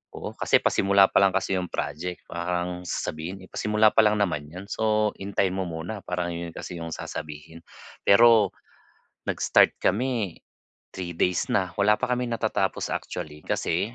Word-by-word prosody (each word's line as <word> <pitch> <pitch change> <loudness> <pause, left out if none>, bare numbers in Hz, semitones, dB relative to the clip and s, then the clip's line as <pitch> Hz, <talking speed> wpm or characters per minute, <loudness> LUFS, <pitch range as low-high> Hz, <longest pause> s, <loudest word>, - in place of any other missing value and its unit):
oo - - -6
kasi - - +4
pasimula 100 0 +4
pa - - +5
lang 95 -1 +3
kasi 95 0 0
'yong 90 -1 -2
project 80 +5 -4
parang 90 +1 -2
sasabihin, 90 +6 -4
eh, - - -21
"Pasimula 105 +1 +3
pa - - +6
lang 105 - +4
naman 75 -7 -1
'yon, 90 +4 -8
so 110 -1 +1
hintayin 95 -1 0
mo 95 - -1
muna." 85 +6 -5
parang 90 -1 -2
'yon 85 -1 -5
kasi 90 - -7
'yong 85 -1 -5
sasabihin. 75 +2 -7 0.5
Pero 110 -1 +6 0.8
nag-start - - +3
kami 110 -4 0 0.6
3 90 -2 -5
days 90 0 +1
na 95 -3 +1
wala 105 +1 +5
pa 125 -1 -1
kaming 125 -1 0
natatapos 115 - -1
actually, 75 0 -5
kasi 100 +8 -1
95 Hz, 160 wpm, -26 LUFS, 85-105 Hz, 0.8 s, pa